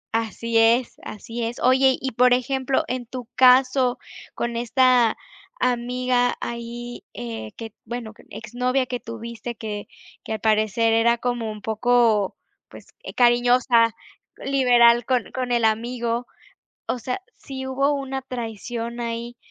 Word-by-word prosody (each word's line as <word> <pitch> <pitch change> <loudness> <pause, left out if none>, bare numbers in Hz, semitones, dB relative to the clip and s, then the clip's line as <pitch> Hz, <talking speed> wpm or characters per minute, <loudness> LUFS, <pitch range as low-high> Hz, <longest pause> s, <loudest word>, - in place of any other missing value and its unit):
Así 230 +1 0
es, 230 +2 +3
así 230 +3 -6
es. 230 +1 -4
Oye, 260 +1 +4
y 265 - -3
por 250 +1 +4
ejemplo, 265 +1 0
en 250 -1 -4
tu 250 0 -7
caso 255 0 +4 0.4
con 235 0 -3
esta 245 -1 +3 0.4
amiga 250 0 +1
ahí, 235 +1 -6
eh, 110 -2 -6
que 225 -2 -8
bueno, 235 -2 -6
que - - -19
exnovia 250 +4 -1
que 250 -1 -4
tuviste 230 0 -7
que 210 -2 -6 0.4
que - - -4
al 220 - -3
parecer 220 +1 +2
era 235 +1 +3
como 240 -2 -2
un 210 -1 -10
poco, 220 -2 +2 0.3
pues, - - -13 0.2
eh, - - -9
cariñosa, 240 -1 +4 0.4
liberal 245 -3 +4
con 250 -3 0
con 255 -1 -3
el 235 -2 +2
amigo. 235 +2 -1 0.6
O 250 - -1
sea, 250 - -4 0.2
si 265 -1 -7
hubo 275 +2 +1
una 270 -1 -4
traición 235 -1 -5
ahí, 235 0 -4
240 Hz, 140 wpm, -23 LUFS, 230-250 Hz, 0.6 s, Oye